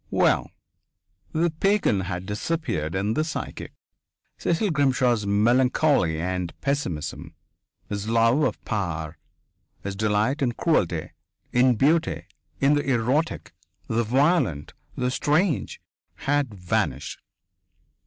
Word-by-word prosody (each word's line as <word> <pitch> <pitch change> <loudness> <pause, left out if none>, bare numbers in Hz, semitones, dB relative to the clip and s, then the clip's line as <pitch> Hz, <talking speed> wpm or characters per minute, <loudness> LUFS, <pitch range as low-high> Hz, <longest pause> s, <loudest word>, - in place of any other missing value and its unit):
Well.... - - +2 0.8
The 165 +1 +1
pagan 195 - +2
had 90 -1 -4
disappeared 105 - -2
in 100 +3 0
the 155 - +1
psychic! 160 - -5 0.7
Cecil 175 +4 +1
Grimshaw's 130 -7 +2
melancholy 120 - +3
and 90 0 -3
pessimism, 140 - -3 0.5
his 105 +1 -4
love 115 +5 +3
of 130 -8 -1
power, 80 -6 -3 0.6
his 100 0 -4
delight 110 +7 +1
in 125 -3 +1
cruelty, 95 - 0 0.4
in 125 0 +4
beauty, 155 +8 +1 0.3
in 140 +1 +4
the 145 -1 +1
erotic, 130 +6 0 0.3
the 115 +1 +1
violent, 125 - +1 0.2
the 125 0 0
strange, 155 +5 0 0.4
had 145 -3 0
vanished! 90 -4 -2
120 Hz, 105 wpm, -25 LUFS, 100-145 Hz, 0.8 s, in